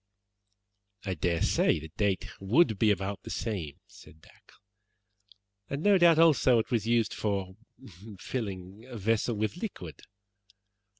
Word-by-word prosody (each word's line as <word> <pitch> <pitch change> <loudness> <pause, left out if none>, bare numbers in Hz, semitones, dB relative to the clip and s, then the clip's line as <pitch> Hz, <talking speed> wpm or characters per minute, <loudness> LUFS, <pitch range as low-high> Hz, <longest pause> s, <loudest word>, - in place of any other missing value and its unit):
"I 95 - -1
dare 85 0 -1
say - - +2
the 80 +1 -10
date 100 -3 0
would 110 - +2
be 110 - +4
about 100 -1 -1
the - - -10
same," 90 -11 -4
said 80 - -17
Dacre, - - -22 1.1
"and, 140 +3 -4
no 205 -2 +5
doubt, 170 -2 +6
also, 155 -6 +5
it 110 -1 -2
was 115 -3 0
used 115 -1 +1
for 95 -3 -3 0.6
filling 100 -3 -6
a 125 -3 -8
vessel 115 +3 0
with 110 +9 -2
liquid. 95 - -7
105 Hz, 135 wpm, -29 LUFS, 95-120 Hz, 1.1 s, doubt